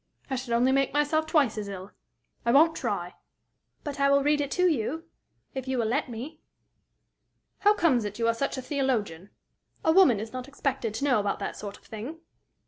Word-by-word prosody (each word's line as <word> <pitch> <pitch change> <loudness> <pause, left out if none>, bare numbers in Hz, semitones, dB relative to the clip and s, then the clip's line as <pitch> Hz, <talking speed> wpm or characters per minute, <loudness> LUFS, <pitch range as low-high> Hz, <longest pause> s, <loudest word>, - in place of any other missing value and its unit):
I - - +1
should 250 -2 -3
only 250 +3 +3
make 275 0 +1
myself 310 +2 +2
twice 280 -9 +2
as 205 - -5
ill. 190 0 -8 0.5
I 235 - +2
won't 320 +5 +5
try." 200 -7 -3 0.7
"But 285 -2 -5
I 280 0 +4
will 280 0 +4
read 295 +1 +3
to 360 +4 +2
you, 310 +1 -1 0.5
if 265 -1 -5
you 260 0 -1
will 235 - +1
let 255 +5 0
me." 260 +7 -7 1.2
"How 415 +1 +4
comes 280 - +3
it 205 0 -5
you 230 -1 +1
are 230 - +3
such 275 +4 -2
a 260 - -5
theologian? 230 - -1 0.6
A 320 - +5
woman 320 - +6
is 220 +2 -6
not 255 0 -5
expected 270 -6 -2
to 275 - -1
know 255 -6 +3
about 200 -1 -1
that - - -4
sort 205 -1 -7
of - - -26
thing." 240 +10 -7
260 Hz, 200 wpm, -27 LUFS, 225-290 Hz, 1.2 s, woman